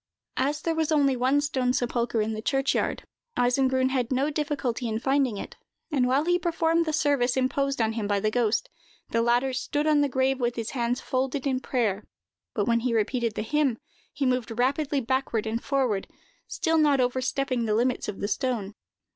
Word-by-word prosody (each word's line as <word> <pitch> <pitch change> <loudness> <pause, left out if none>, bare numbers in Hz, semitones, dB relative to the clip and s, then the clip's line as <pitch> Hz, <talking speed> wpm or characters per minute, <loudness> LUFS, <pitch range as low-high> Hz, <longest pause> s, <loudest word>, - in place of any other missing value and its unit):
As 290 +3 0
there 330 - +1
was 320 -1 0
only 280 -3 +3
one 260 +4 +2
stone 260 -4 0
sepulchre 240 -2 0
in 220 +1 -2
the 215 - -4
churchyard, 270 +3 0 0.3
Eisengrun 260 +1 +2
had 255 -2 -1
no 270 +4 +1
difficulty 285 -5 -2
in 220 -1 -1
finding 265 -2 +1
it; - - -8 0.3
and 260 -4 +2
while 270 +4 +2
he 355 +1 +2
performed 335 -1 +1
the - - +1
service 285 -5 +1
imposed 275 +1 0
on 225 -1 +1
him 220 -3 -2
by 205 -1 +1
the 215 +2 0
ghost, 225 -2 +1 0.4
the 230 - +2
latter 240 +3 +2
stood 290 +3 -1
on 305 -1 +4
the 285 - +2
grave 265 0 +1
with 240 -1 0
his 230 -1 -4
hands 245 -1 -1
folded 265 +1 -1
as - - -10
if 275 - +2
in 255 - 0
prayer; 220 -6 -1 0.5
but 205 -4 +1
when 235 0 +2
he 235 0 -1
repeated 230 0 0
the - - -2
hymn, 285 -1 +1 0.3
he 280 - -2
moved 250 -3 -1
rapidly 275 +3 +1
backward 245 -3 -1
and 225 +2 -2
forward, 260 -8 0
but - - -30 0.3
still 325 -2 +1
not 290 -3 +4
overstepping 255 0 0
the 215 -1 +1
limits 245 +2 0
of 205 - -5
the 200 - 0
stone. 225 -5 -2
255 Hz, 200 wpm, -26 LUFS, 235-280 Hz, 0.5 s, on